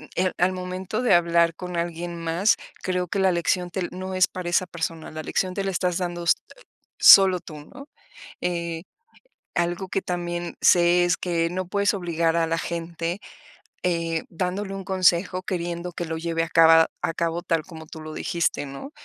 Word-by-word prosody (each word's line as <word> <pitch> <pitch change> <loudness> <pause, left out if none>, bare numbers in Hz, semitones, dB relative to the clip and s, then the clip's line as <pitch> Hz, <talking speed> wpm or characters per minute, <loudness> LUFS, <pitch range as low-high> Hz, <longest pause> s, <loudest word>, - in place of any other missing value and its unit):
em, 185 0 +1
al 180 +1 +3
momento 185 +4 -4
de 245 -7 +4
hablar 170 -1 +3
con 180 -1 -7
alguien 170 0 -3
más, 170 +5 +2 0.3
creo 180 -1 -1
que 200 - -3
la 190 -1 +4
lección, 175 +1 0
te 185 -2 -2
no 185 +1 -6
es 185 0 +4
para 180 -1 -5
esa 180 +1 +1
persona, 165 -1 -5
la 155 0 -7
lección 185 -1 -1
te 195 - -1
la 195 - -1
estás 180 -1 0
dando, 175 -1 -3
eh, - - -6 0.7
solo 190 -2 +8
tú, 155 -3 -10
¿no? 280 - -13 0.5
Eh, 170 -1 -3 0.7
algo 175 +2 -1
que 195 - -1
también 175 -1 -4
sé, 175 0 +5
es 175 - +1
que 170 -2 -1
no 185 0 -4
puedes 200 +2 +1
obligar 170 -3 0
a 165 -1 +2
la 165 0 0
gente, 170 +2 -4 0.7
eh, 165 -2 -1
dándole 185 +3 -3
un 195 0 -6
consejo, 185 0 +2
queriendo 175 -1 -3
que 175 0 -5
lo 160 0 -4
lleve 165 0 -2
a 165 - -5
caba 165 0 +6
a 165 - 0
cabo 170 +1 -2
tal 165 -3 0
como 160 -3 -10
tú 160 +1 -10
lo 155 0 -8
dijiste, 170 -3 -1
¿no? 140 - -9
175 Hz, 185 wpm, -24 LUFS, 165-185 Hz, 0.7 s, solo